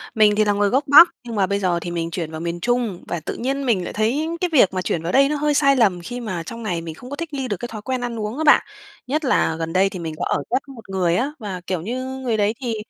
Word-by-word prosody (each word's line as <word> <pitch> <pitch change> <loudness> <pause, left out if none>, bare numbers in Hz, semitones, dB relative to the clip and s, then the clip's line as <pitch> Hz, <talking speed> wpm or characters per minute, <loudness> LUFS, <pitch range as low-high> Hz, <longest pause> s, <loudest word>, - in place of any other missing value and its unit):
mình 210 -1 +5
thì 215 0 +3
là 205 - +2
người 205 0 +2
gốc 265 +4 +2
Bắc 310 +5 +9
nhưng 235 -2 -6
mà 195 -2 +3
bây 200 +1 0
giờ 180 -3 +1
thì 175 - -5
mình 170 -1 -3
chuyển 165 -2 -4
vào 160 - -6
miền 170 0 -3
Trung 235 -2 -1
và 175 - -3
tự 155 - -5
nhiên 270 +3 -2
mình 210 -7 +1
lại - - -6
thấy 240 +9 0
cái 360 - +1
việc 225 -10 +5
mà 185 - -1
chuyển 170 - -2
vào 170 - -2
đây 275 +4 +4
nó 300 - 0
hơi 295 0 +1
sai 275 -1 +4
lầm 200 -8 +2
khi 245 +8 -6
mà 190 -8 -4
trong 230 +6 -8
này 175 -5 -2
mình 165 -1 -7
không 250 +9 -12
thích 330 -1 -6
nghi 270 -2 -3
được 205 - -2
thói 215 -3 -7
quen 255 +3 -3
ăn 240 -2 -4
uống 215 +4 -4
á 315 - -1
bạn. 300 - +6 0.4
Nhất 300 +4 -1
là 205 -10 +2
gần 165 0 -3
đây 190 +1 +3
thì 190 - -7
mình 165 -2 -5
có - - -2
ở 145 - -1
ghép, 255 - +2
ừm, 275 - -11
một 225 -4 -14
người 180 -3 +1
á 265 +10 0
và, 195 -5 -5
kiểu 185 -3 -2
như, 250 +8 -4
người 245 -4 -1
đấy 210 +1 +2
thì 240 -3 -2
215 Hz, 305 wpm, -21 LUFS, 180-255 Hz, 0.4 s, Bắc